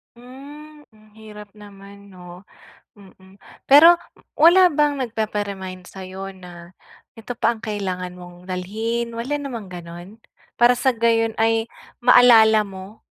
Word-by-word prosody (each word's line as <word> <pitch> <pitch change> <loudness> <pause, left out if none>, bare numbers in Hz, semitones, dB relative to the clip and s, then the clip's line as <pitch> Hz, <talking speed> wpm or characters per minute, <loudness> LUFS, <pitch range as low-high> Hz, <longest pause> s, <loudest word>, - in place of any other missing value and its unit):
Hmm, 290 +5 -14
ang 215 0 -23
hirap 210 -1 -13
naman 200 -1 -15
'no. 180 +1 -14 0.5
Mm. 190 0 -19 0.3
Pero 320 +5 +8 0.4
wala 345 +4 +6
bang 295 -1 +1
nagpapa-remind 205 -6 -5
sa'yo 190 +1 -9
na 175 -1 -14 0.4
ito 230 0 -9
pa 235 - +1
ang 225 - -16
kailangan 190 -4 -5
mong 175 +1 -13
dalhin, 225 +6 -4
wala 255 +6 -4
namang 240 -9 -8
gano'n? 175 +4 -11 0.4
Para 240 +1 +5
sa 260 +2 0
gayon 230 -1 0
ay 225 0 0 0.3
maalala 225 -3 +5
mo? 195 +2 -12
215 Hz, 125 wpm, -20 LUFS, 190-240 Hz, 0.5 s, Pero